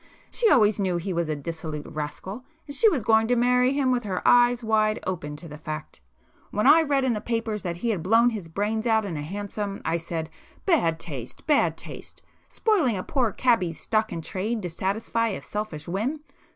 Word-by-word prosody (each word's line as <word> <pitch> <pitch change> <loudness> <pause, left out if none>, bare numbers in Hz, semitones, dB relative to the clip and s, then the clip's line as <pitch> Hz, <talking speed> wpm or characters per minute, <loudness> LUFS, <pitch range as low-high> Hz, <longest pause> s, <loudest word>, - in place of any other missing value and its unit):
She 465 -3 +3
always 215 - +4
knew 185 -3 +1
he 180 +2 -3
was 170 -2 -1
a 155 - 0
dissolute 155 0 -5
rascal, 155 - -6 0.2
and 285 - -7
she 445 - +5
was 280 - -1
going 220 +1 +4
to 245 - +3
marry 250 +2 +3
him 275 -2 +2
with 250 -1 +1
her 190 -3 -2
eyes 245 0 +5
wide 215 -1 +2
open 160 -5 -3
to 165 +3 -10
the 150 -1 -10
fact. 155 - -7 0.5
When 210 - -1
I 325 - +8
read 280 -4 +1
in 250 - +2
the 210 - -3
papers 225 -2 -2
that 170 -2 -4
he 235 +6 -2
had 195 -6 -2
blown 230 +7 +4
his 205 -7 -5
brains 210 +6 -1
out 220 -2 +3
in 180 -5 -4
a 150 - -3
hansom, 200 +4 -4
I 165 +1 +1
said 165 -1 -5 0.3
'Bad 170 - +2
taste—bad 155 - -1
taste! - - -9 0.3
spoiling 330 - +2
a 185 - -3
poor 255 -7 0
cabby's 195 -10 +1
stock 220 0 0
in 165 - -4
trade 210 +5 -2
to 175 - -3
satisfy 220 +6 -1
a 205 - -3
selfish 210 -8 -5
whim! 225 - -2
210 Hz, 205 wpm, -25 LUFS, 170-240 Hz, 0.5 s, I